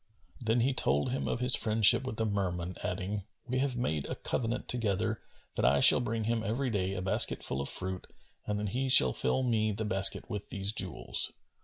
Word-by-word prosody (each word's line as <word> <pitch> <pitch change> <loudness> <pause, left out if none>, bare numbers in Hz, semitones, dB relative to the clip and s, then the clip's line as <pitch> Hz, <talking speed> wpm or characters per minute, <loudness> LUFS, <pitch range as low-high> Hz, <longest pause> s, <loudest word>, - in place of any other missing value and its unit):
Then 115 +1 +1
he 130 +3 0
told 75 - 0
him 130 - -3
of 125 - -3
his 125 0 +6
friendship 110 +3 +4
with 110 - -6
the 110 - -1
Merman, 90 -4 -3
adding, 95 +3 -4 0.3
"We 130 +1 -2
have 135 -2 -1
made 80 - -3
a - - -5
covenant 120 +1 -4
together 110 -2 -1 0.3
that - - -3
I 70 +4 +3
shall - - +6
bring 115 -2 -3
him 115 +1 -1
every 120 +4 -3
day 95 -2 -2
a 90 - -5
basket 95 - +2
full 65 - -1
of 70 - +2
fruit 95 0 +2 0.4
and 105 - -2
that 105 -1 -3
he 130 +5 -3
shall 65 - +8
fill 65 - 0
me 110 -3 0
the 110 +2 -4
basket 95 -1 +1
with 105 -4 -7
these 100 0 0
jewels." 95 -5 -4
105 Hz, 205 wpm, -29 LUFS, 95-120 Hz, 0.4 s, shall